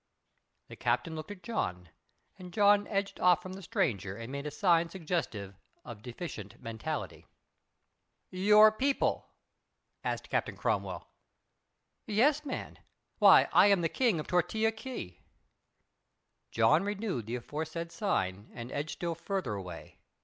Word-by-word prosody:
The - - -10
Captain 160 - -1
looked 155 +2 -7
at 205 -3 -9
John 90 - -3 0.5
and 180 -1 -9
John 205 +1 +4
edged 200 -1 -2
off 180 -2 +5
from 185 - -8
the 195 - -8
stranger 100 - -1
and 115 +2 -7
made 140 +1 -4
a - - -1
sign 170 +1 +2
suggestive 160 - -3 0.3
of 115 -4 -9
deficient 120 - -7
mentality. 115 -2 -5 1.0
"Your 210 +3 +6
people?" 270 +5 0 0.8
asked - - -3
Captain - - -1
Cromwell. - - -2 1.0
"Yes, 275 +8 +3
man. 275 -3 -6 0.4
Why, - - +8
I - - +7
am 200 -3 +4
the 165 - +1
King 230 -7 +1
of 150 - -4
Tortilla 220 +5 +1
Key." 220 - -7 1.3
John 115 +8 +4
renewed 200 - -3
the 120 - -2
aforesaid 160 +6 -5
sign 105 - -2
and 120 +1 -7
edged 145 +2 -3
still 170 -1 -3
farther 170 - -3
away. 90 -5 -8
170 Hz, 135 wpm, -31 LUFS, -, 1.3 s, Why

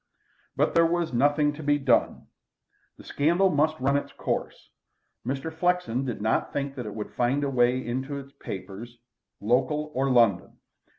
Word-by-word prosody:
But - - +1
there 165 - +5
was 170 -3 -1
nothing 145 +4 +2
to 150 - -9
be 145 -1 +2
done. 135 -4 +1 0.7
The - - -14
scandal 175 +6 +2
must 155 +2 +1
run 135 +2 +1
its 145 - -4
course. - - -4 0.6
Mr. 135 +5 -3
Flexen 160 -7 0
did 120 -5 -4
not 110 - 0
think 140 -1 -3
that 125 -5 -6
it 105 - -7
would 105 -1 -6
find 130 +4 +1
its 140 -1 -1
way 125 +1 +2
into 130 +4 -3
the 135 - -19
papers, 100 +5 -8 0.4
local 130 +7 0
or 135 +1 0
London. 115 -8 +2
135 Hz, 165 wpm, -26 LUFS, 120-150 Hz, 0.7 s, there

